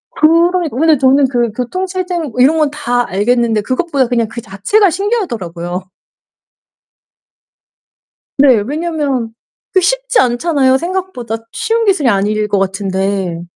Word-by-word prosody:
그러니까 335 -1 +2
근데 315 +1 +4
저는 270 +1 +4
그 240 -3 0
교통 255 - -3
체증 360 -6 -3
뭐 250 - -7
이런 300 +5 +4
건 305 -2 +2
다 245 -5 -1
알겠는데 225 +2 +1
그것보다 265 +3 -1
그냥 235 -2 0
그 235 +2 -7
자체가 350 - +1
신기하더라고요. 190 - -3 2.5
네. 275 -2 +6
왜냐면 290 -6 -2 0.4
그 375 - +4
쉽지 - - +1
않잖아요 260 +1 +2
생각보다 340 - -4 0.2
쉬운 455 0 -1
기술이 340 - +2
아닐 210 +1 0
것 205 -1 0
같은데. 190 -2 -2
260 Hz, 290 characters per minute, -14 LUFS, 220-340 Hz, 2.5 s, 네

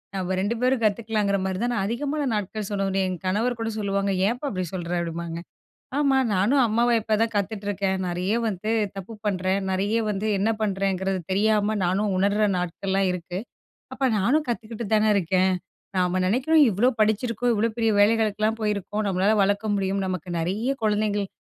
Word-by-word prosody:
நாம 185 0 -2
2 205 +5 0
பேரும் 255 -1 +2
கத்துக்லாம்ன்கிற 210 -2 +1
மாதிரி 190 0 -2
தான் 245 - 0
நான் 195 -4 0
அதிகமான 290 +6 -2
நாட்கள்னு 210 0 -3
சொல்ல 195 -1 -1
முடியும். 190 -1 0
என் 180 -3 -5
கணவர் 225 +6 +1
கூட 225 - -2
சொல்வாங்க, 200 -1 0 0.2
"ஏம்ப்பா 245 +6 -2
அப்டி 185 -2 -2
சொல்ற?" 175 -2 -4
அப்டின்பாங்க. 170 0 -4 0.6
"ஆமா 275 -2 +3 0.2
நானும் 225 +9 +3
அம்மாவா 235 +2 +2
இப்ப 215 -1 +1
தான் 225 0 0
கத்துட்ருக்கேன். 200 -1 -1
நெறைய 180 +4 -1
வந்து 215 +2 -3 0.3
தப்பு 195 +4 -7
பண்றேன், 190 0 0
நெறைய 205 +4 +1
வந்து 205 +1 -2
என்ன 210 +3 +1
பண்றேங்றது 195 -2 0
தெரியாம 210 +1 +2
நானும் 195 +3 +1
உணர்ற 205 +2 +2
நாட்கள்லாம் 190 +2 -1
இருக்கு. 180 +1 -5 0.6
அப்ப 270 - -1
நானும் 285 +10 +2
கத்துக்கிட்டு 225 -1 -4
தானே 215 0 +3
இருக்கேன்." 185 0 +2 0.4
நாம 180 0 +1
நெனைக்றோம் 270 +10 +4
இவ்ளோ 220 +7 +3
படிச்சிருக்கோம், 230 +3 +1
இவ்ளோ 225 +3 +1
பெரிய 225 -1 +2
வேலைகளுக்குல்லாம் 215 +1 +2
போயிருக்கோம். 210 0 -1
நம்மளால 195 +3 +2
வளர்க்க 205 +2 0
முடியும். 195 0 -1
நமக்கு 185 -1 -4
நெறைய 205 +10 -1
குழந்தைங்கள் 210 -1 +1
205 Hz, 160 wpm, -24 LUFS, 190-225 Hz, 0.6 s, நெனைக்றோம்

